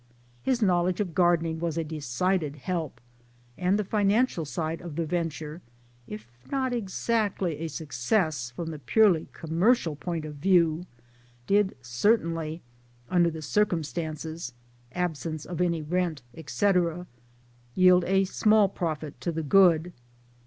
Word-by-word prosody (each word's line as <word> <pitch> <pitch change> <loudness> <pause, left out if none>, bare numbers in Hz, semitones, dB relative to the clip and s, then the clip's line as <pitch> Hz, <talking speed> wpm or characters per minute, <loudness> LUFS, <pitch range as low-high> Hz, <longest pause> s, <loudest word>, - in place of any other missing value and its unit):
His 245 - +1
knowledge 180 -1 +2
of 190 -5 -2
gardening 165 -2 +2
was 170 -1 -2
a 165 - 0
decided 155 +2 -1
help, 160 -3 -4 0.6
and 180 +6 +1
the 210 - 0
financial 205 -2 +1
side 160 +2 -3
of 170 -4 -8
the 165 0 -1
venture 160 -1 -3 0.5
if 105 0 -8 0.3
not 260 -2 0
exactly 200 -6 -1
a 165 - -3
success 150 - -1
from 160 +7 -5
the 155 - -7
purely 175 - +3
commercial 165 +1 +1
point 165 +1 -4
of 150 -1 -8
view 170 0 +2 0.6
did 200 +2 +2
certainly 165 - 0 0.5
under 175 -2 +4
the 160 -1 -7
circumstances 160 -5 -2 0.4
(absence 160 -3 -3
of 175 0 -4
any 170 -3 0
rent, 165 -3 -1
etc.) 175 +1 0 0.7
yield 185 -1 +6
a 195 +1 +3
small 210 +2 +4
profit 155 -5 -4
to 170 - -1
the 160 0 -3
good. 175 +1 +4
170 Hz, 130 wpm, -27 LUFS, 155-185 Hz, 0.7 s, yield